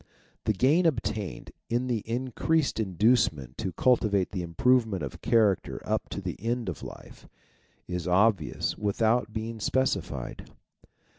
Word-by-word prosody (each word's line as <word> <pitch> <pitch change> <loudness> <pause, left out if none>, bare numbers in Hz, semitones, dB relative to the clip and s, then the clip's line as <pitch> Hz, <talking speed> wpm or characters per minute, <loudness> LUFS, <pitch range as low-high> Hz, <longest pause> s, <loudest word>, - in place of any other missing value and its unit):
The 110 - +2
gain 150 - +4
obtained 105 - -3 0.2
in 120 +2 0
the 120 -3 0
increased 130 +5 0
inducement 95 - +2
to 95 - -2
cultivate 105 -3 +2
the 95 - -3
improvement 105 - +2
of 65 - -6
character 105 -5 +2
up - - -1
to - - -5
the - - -4
end 115 -1 -1
of 80 - -6
life, - - -11 0.6
is 90 -1 -3
obvious 95 -2 +2
without 110 +2 +1
being 110 +1 -4
specified. 130 +5 -1
110 Hz, 130 wpm, -28 LUFS, 95-125 Hz, 0.6 s, gain